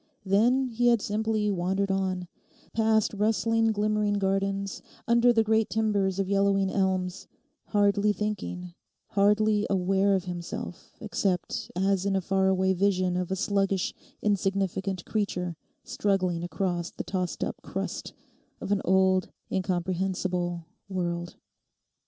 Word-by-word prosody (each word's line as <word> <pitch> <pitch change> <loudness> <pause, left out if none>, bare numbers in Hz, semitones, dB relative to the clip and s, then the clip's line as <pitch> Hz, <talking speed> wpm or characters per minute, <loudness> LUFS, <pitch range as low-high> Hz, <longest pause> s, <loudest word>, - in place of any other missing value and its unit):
Then 235 +7 +3
he 240 +1 +1
had 235 -1 +5
simply 215 0 0
wandered 190 +2 0
on, 185 -2 -1 0.5
past 220 -1 +2
rustling 225 +2 +2
glimmering 210 0 +1
gardens, 195 0 -1 0.3
under 235 +1 +5
the 225 -2 +3
great 220 0 +2
timbers 205 -4 +1
of 195 -1 0
yellowing 195 -1 +2
elms, 185 -2 -1 0.4
hardly 205 0 +3
thinking, 195 -4 -4 0.4
hardly 210 +1 +3
aware 195 +1 +2
of 190 - -1
himself 175 -1 -6
except 195 -4 -2
as 190 0 +1
in 195 - +1
a - - +3
far 190 +1 +1
away 190 0 +3
vision 185 -1 +1
of 180 -1 -1
a 190 - 0
sluggish 195 -1 0 0.3
insignificant 195 -2 0
creature 180 -5 -2 0.3
struggling 195 -8 0
across 175 -1 -2
the - - -6
tossed 185 -2 -2
up - - -4
crust - - -4 0.5
of - - -5
an 205 -1 +2
old, 190 0 +3 0.2
incomprehensible 180 -1 -1 0.2
world. 175 -2 -3
195 Hz, 125 wpm, -27 LUFS, 185-210 Hz, 0.5 s, had